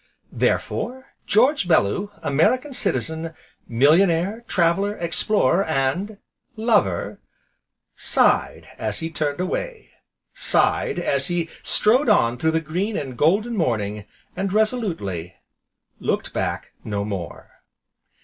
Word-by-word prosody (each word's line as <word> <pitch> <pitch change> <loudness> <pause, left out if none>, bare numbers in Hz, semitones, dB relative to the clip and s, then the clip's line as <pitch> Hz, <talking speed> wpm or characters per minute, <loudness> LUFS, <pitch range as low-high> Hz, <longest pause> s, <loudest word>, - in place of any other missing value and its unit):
Therefore 260 +2 -2
George 250 - +3
Bellew, 160 - +2
American 250 - +1
Citizen, 160 - -2 0.3
millionaire, 170 - +3
traveller, 190 +4 +1
explorer, 170 0 +2
and 160 +8 -1 0.4
LOVER, 215 - +1 0.8
sighed - - +1
as 110 -2 -2
he 165 0 -4
turned 150 -2 -2
away, 440 - -4 0.4
sighed - - +1
as 140 -6 0
he 175 -2 -1
strode 245 +5 +3
on 120 - +4
through 160 - +2
the 160 0 +2
green 180 +7 -2
and 130 -3 -5
golden 205 - +2
morning, 105 - -1 0.3
and 195 0 -2
resolutely 185 - -1 0.6
looked - - -2
back - - -3
no 100 -1 -3
more. 95 -6 -7
170 Hz, 105 wpm, -22 LUFS, 135-210 Hz, 0.8 s, on